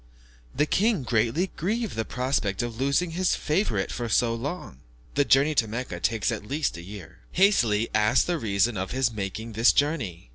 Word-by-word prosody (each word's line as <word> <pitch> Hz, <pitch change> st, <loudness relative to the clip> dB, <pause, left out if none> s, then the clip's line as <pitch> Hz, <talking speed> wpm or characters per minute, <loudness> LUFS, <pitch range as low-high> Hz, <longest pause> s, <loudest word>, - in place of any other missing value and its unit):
The 150 Hz, -, +2 dB
king, 205 Hz, -, +1 dB
greatly 120 Hz, -, 0 dB
grieved 220 Hz, +6 st, -2 dB
at -, -, -9 dB
the 110 Hz, 0 st, -2 dB
prospect 125 Hz, -5 st, -1 dB
of 120 Hz, -1 st, -4 dB
losing 140 Hz, +6 st, +1 dB
his 180 Hz, +2 st, +1 dB
favourite 150 Hz, -, -1 dB
for 120 Hz, -1 st, -4 dB
so 115 Hz, +1 st, +2 dB
long 125 Hz, -, -6 dB, 0.3 s
(the 145 Hz, -, +3 dB
journey 140 Hz, +3 st, +4 dB
to 115 Hz, -6 st, +2 dB
Mecca 110 Hz, -5 st, -5 dB
takes 110 Hz, +4 st, 0 dB
at 110 Hz, -, -4 dB
least 140 Hz, -, -2 dB
a 85 Hz, -, -8 dB
year), 95 Hz, -1 st, -11 dB
hastily 120 Hz, -, +3 dB
asked 105 Hz, 0 st, +3 dB
the 175 Hz, -2 st, -1 dB
reason 105 Hz, 0 st, +1 dB
of 95 Hz, +1 st, -3 dB
his 130 Hz, -2 st, 0 dB
making 110 Hz, +2 st, -5 dB
this 115 Hz, +3 st, +5 dB
journey. 120 Hz, -, -1 dB
120 Hz, 185 wpm, -26 LUFS, 105-150 Hz, 0.3 s, this